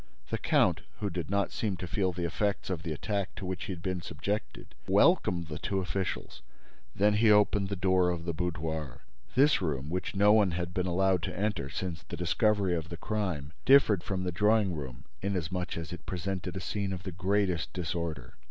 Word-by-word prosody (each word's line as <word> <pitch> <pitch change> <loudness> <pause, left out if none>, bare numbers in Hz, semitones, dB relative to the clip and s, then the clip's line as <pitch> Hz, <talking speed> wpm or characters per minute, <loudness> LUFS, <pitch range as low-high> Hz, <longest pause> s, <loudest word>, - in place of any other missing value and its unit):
The - - -1
count, - - +3 0.2
who 105 -2 -2
did 85 -3 -4
not 100 +1 +1
seem 100 -4 -2
to 90 - -5
feel 95 +2 0
the 90 0 -3
effects 100 +4 -1
of 85 -4 -2
the 85 -2 -4
attack 100 +5 -2
to 95 - -6
which 90 0 -3
he - - -4
had 85 -2 -6
been 95 -2 -2
subjected, 85 +7 -4
welcomed 95 - +4
the 75 -1 -6
two 95 - -2
officials. 95 0 -3 0.5
Then 105 +2 +4
he 110 +1 +4
opened 105 -1 +4
the 100 - -1
door 95 -1 +3
of 85 -1 -3
the 85 - -1
boudoir. 80 -5 -3 0.3
This 140 0 +5
room, 75 -4 -2
which 90 +3 -3
no 100 +2 +6
one 105 -5 +4
had 85 0 -3
been 95 0 0
allowed 95 0 +2
to 95 -1 -4
enter 105 -10 -1
since 85 +2 -4
the - - -8
discovery 95 +3 +2
of 80 -1 -4
the 85 - -6
crime, 90 -9 -2
differed 130 -9 +6
from 95 -1 -2
the 90 - -1
drawing 105 +1 +3
room 65 -6 -7 0.2
inasmuch 90 -2 -2
as 80 0 -5
it 90 - -10
presented 95 0 -3
a - - -4
scene 100 +3 -2
of 90 -1 -6
the 95 - -4
greatest 95 -1 0
disorder. 80 -7 -4
90 Hz, 200 wpm, -30 LUFS, 85-100 Hz, 0.5 s, no